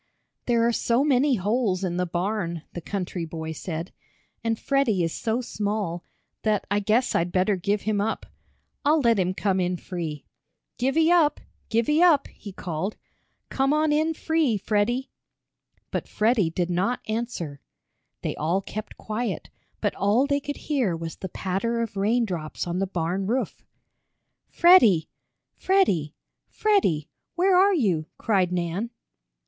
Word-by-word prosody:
"There 235 Hz, -2 st, +3 dB
are -, -, +3 dB
so 235 Hz, +2 st, +1 dB
many 280 Hz, -1 st, +3 dB
holes 205 Hz, -1 st, 0 dB
in 175 Hz, -2 st, -1 dB
the 180 Hz, 0 st, 0 dB
barn," 175 Hz, -2 st, -2 dB
the 175 Hz, -, -5 dB
country 180 Hz, -1 st, -4 dB
boy 160 Hz, 0 st, -5 dB
said, 165 Hz, +2 st, -5 dB, 0.5 s
"and 225 Hz, -1 st, 0 dB
Freddie 250 Hz, -10 st, +1 dB
is 165 Hz, -, -1 dB
so 230 Hz, +2 st, -1 dB
small, 205 Hz, -6 st, -3 dB, 0.4 s
that 215 Hz, -2 st, +1 dB
I 205 Hz, -, +3 dB
guess 225 Hz, +5 st, +2 dB
I'd 175 Hz, +1 st, +1 dB
better 190 Hz, +3 st, +2 dB
give 200 Hz, +3 st, -1 dB
him 210 Hz, -2 st, 0 dB
up. 225 Hz, +2 st, -2 dB, 0.6 s
I'll 305 Hz, +2 st, +4 dB
let 230 Hz, -6 st, +3 dB
him 185 Hz, 0 st, 0 dB
come 195 Hz, -2 st, +1 dB
in 180 Hz, 0 st, 0 dB
free. 165 Hz, -5 st, -5 dB, 0.5 s
Givey 315 Hz, +7 st, +3 dB
up! 330 Hz, -4 st, +4 dB, 0.3 s
Givey 235 Hz, +8 st, +2 dB
up!" 320 Hz, -6 st, +5 dB
he 205 Hz, -, -10 dB
called. 180 Hz, +2 st, -4 dB, 0.5 s
"Come 270 Hz, +2 st, +1 dB
on 305 Hz, 0 st, +2 dB
in 315 Hz, +2 st, +1 dB
free, 315 Hz, -10 st, +1 dB
Freddie." 220 Hz, +6 st, 0 dB, 0.8 s
But -, -, -3 dB
Freddie 215 Hz, -5 st, +2 dB
did 175 Hz, +1 st, -2 dB
not 195 Hz, +8 st, 0 dB
answer. 215 Hz, -, -3 dB, 0.6 s
They -, -, -2 dB
all 165 Hz, +5 st, +1 dB
kept 215 Hz, +2 st, -7 dB
quiet, 225 Hz, +2 st, -4 dB, 0.3 s
but -, -, +1 dB
all 215 Hz, +7 st, +2 dB
they 285 Hz, 0 st, +1 dB
could 290 Hz, 0 st, -5 dB
hear 250 Hz, -, 0 dB
was 165 Hz, -1 st, -6 dB
the 190 Hz, -, -6 dB
patter 195 Hz, +7 st, -2 dB
of 230 Hz, -3 st, -3 dB
rain 225 Hz, +5 st, +2 dB
drops 165 Hz, -6 st, -4 dB
on 175 Hz, +1 st, -2 dB
the 195 Hz, -, 0 dB
barn 185 Hz, +2 st, -2 dB
roof. 250 Hz, +5 st, -2 dB, 0.9 s
"Freddie! 235 Hz, -, +6 dB, 0.4 s
Freddie! 190 Hz, -, +1 dB, 0.3 s
Freddie! 280 Hz, -, +1 dB, 0.3 s
Where 365 Hz, +2 st, +3 dB
are 385 Hz, +2 st, +5 dB
you?" 180 Hz, -, +1 dB
cried 190 Hz, -5 st, +1 dB
Nan. 180 Hz, +5 st, -2 dB
210 Hz, 150 wpm, -25 LUFS, 180-255 Hz, 0.9 s, Freddie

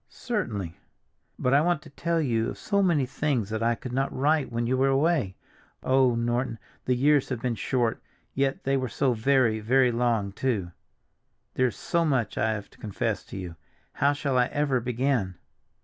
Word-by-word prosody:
"Certainly." 105 Hz, -, -4 dB, 0.6 s
"But 125 Hz, -, +1 dB
I 140 Hz, -, +6 dB
want 170 Hz, -1 st, +1 dB
to 155 Hz, -, -14 dB
tell 170 Hz, +3 st, -1 dB
you 120 Hz, -6 st, 0 dB
of -, -, -7 dB
so 200 Hz, -1 st, 0 dB
many 165 Hz, -8 st, +2 dB
things 125 Hz, -5 st, -1 dB
that 110 Hz, 0 st, -2 dB
I 115 Hz, +1 st, +2 dB
could 125 Hz, +1 st, -8 dB
not 135 Hz, +2 st, 0 dB
write 145 Hz, 0 st, +1 dB
when 115 Hz, 0 st, -1 dB
you 125 Hz, +2 st, +1 dB
were 135 Hz, +1 st, +2 dB
away. 135 Hz, -, +1 dB, 0.5 s
Oh, 130 Hz, -2 st, +3 dB
Norton, 120 Hz, +1 st, -1 dB, 0.3 s
the 125 Hz, -, +2 dB
years 145 Hz, +2 st, +3 dB
have 130 Hz, -3 st, -2 dB
been 125 Hz, 0 st, -1 dB
short, 115 Hz, +2 st, -1 dB, 0.3 s
yet 135 Hz, 0 st, 0 dB
they 135 Hz, 0 st, +1 dB
were 130 Hz, -2 st, -2 dB
so 130 Hz, +1 st, +1 dB
very, 115 Hz, -1 st, +2 dB
very 125 Hz, +3 st, +3 dB
long, 115 Hz, -4 st, 0 dB
too! 100 Hz, -5 st, -2 dB, 0.8 s
There 130 Hz, -, +2 dB
is 120 Hz, -, -5 dB
so 170 Hz, -1 st, 0 dB
much 130 Hz, -8 st, 0 dB
I 110 Hz, -, +1 dB
have 105 Hz, -2 st, -6 dB
to -, -, -21 dB
confess 105 Hz, -3 st, -2 dB
to -, -, -8 dB
you—how 90 Hz, -, -3 dB
shall 140 Hz, -3 st, 0 dB
I 125 Hz, -, +3 dB
ever 145 Hz, -3 st, 0 dB
begin?" 120 Hz, -5 st, -1 dB
125 Hz, 185 wpm, -26 LUFS, 115-140 Hz, 0.8 s, I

